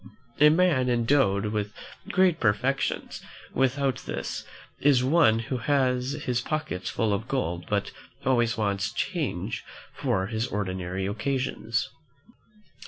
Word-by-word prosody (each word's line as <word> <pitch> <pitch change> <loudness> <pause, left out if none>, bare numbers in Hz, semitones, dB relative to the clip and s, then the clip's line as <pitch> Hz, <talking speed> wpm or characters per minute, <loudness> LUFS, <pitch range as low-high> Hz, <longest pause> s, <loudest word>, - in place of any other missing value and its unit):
A 150 +1 +8
man 155 -6 +3
endowed 120 -4 +2
with 105 -1 -1 0.4
great 185 -3 +3
perfections, 125 +5 0 0.3
without 135 0 +1
this, - - -4 0.4
is 135 -3 +4
like 130 +4 +1
one 145 -10 +5
who 115 +3 -3
has 130 0 +1
his 125 -1 0
pockets 135 -11 -3
full 110 -2 0
of 105 +4 -2
gold 85 -10 -2
but 100 -1 0 0.3
always 120 -3 +2
wants 100 0 0
change 140 - -2 0.3
for 95 0 0
his 110 +3 -2
ordinary 95 -2 -3
occasions. 115 +1 -1
120 Hz, 120 wpm, -27 LUFS, 105-135 Hz, 0.4 s, A